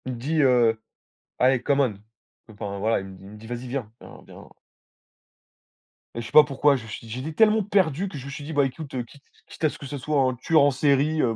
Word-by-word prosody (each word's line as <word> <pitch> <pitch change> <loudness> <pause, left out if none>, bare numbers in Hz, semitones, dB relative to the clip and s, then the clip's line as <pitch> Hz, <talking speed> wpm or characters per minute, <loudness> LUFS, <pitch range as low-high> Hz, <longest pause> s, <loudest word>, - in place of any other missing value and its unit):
Il 130 - -4
me - - -7
dit, 150 +6 0
heu: 120 -4 +3 0.6
«Allez, 130 -1 +3
come 140 -1 +1
on», 130 -6 +2 0.6
enfin, 100 -1 -6
voilà, 110 +3 +1
il 95 - -8
me 95 -1 -12
dit - - -17
il - - -11
me 105 - -11
dit: 110 +1 -13
«Vas-y, 120 +1 -6
viens, 120 -4 -5
viens, - - -13
viens» - - -14 1.7
et 115 - -3
je - - -8
sais - - -9
pas 155 - +9
pourquoi, 140 0 +2
je 120 -4 -6
suis 115 +1 -8
j'étais 130 +7 -5
tellement 215 +5 +3
perdu 190 -3 +1
que 150 - -8
je 135 - -9
me 140 - -7
suis 145 - -7
dit: 155 +3 -6
«Bah, 145 -2 +3
écoute, 135 +1 -7
quitte 140 +4 -19 0.2
quitte - - -13
à 155 - +4
ce - - -10
que - - -10
ce 145 +1 -6
soit 145 +1 0
un 130 -1 +1
tueur 155 +5 +2
en 145 0 +4
série, 145 +3 +2
heu, 115 -2 +1
135 Hz, 255 wpm, -24 LUFS, 120-150 Hz, 1.7 s, pas